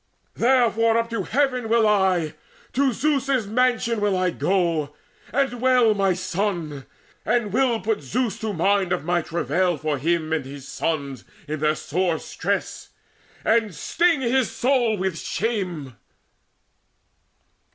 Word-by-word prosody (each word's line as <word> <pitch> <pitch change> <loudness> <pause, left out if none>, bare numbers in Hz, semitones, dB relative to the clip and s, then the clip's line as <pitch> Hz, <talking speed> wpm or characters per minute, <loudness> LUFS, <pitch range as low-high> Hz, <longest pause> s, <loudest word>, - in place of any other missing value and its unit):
Therefore 230 -2 +3
up 230 0 -1
to 230 - -1
heaven 255 -5 0
Will 230 -1 +4
I: 185 -6 +2 0.4
to 270 0 +2
Zeus's 275 -3 0
mansion 235 0 +1
will 205 -2 +1
I 185 -1 +1
go 165 -6 0 0.4
And 260 -3 0
wail 250 -4 +4
my 195 -3 +1
son, 170 -6 -3 0.4
and 220 -3 0
will 250 -2 +2
put 215 -1 -1
Zeus 225 - -2
in 215 -4 -3
mind 190 +1 +2
Of 180 - -1
all - - -14
my 175 0 +1
travail 170 +2 0
for 150 -2 -2
him 160 +1 0
and 160 -3 0
his 135 0 -10
sons 140 -5 -3 0.2
In 155 0 -3
their 155 +1 +2
sore 170 +2 -1
stress, - - -3 0.6
and 220 -5 +2
sting 335 - +1
his 255 0 +1
soul 245 -4 +1
with 185 -3 -2
shame." 180 - -3
200 Hz, 140 wpm, -23 LUFS, 165-235 Hz, 0.6 s, Will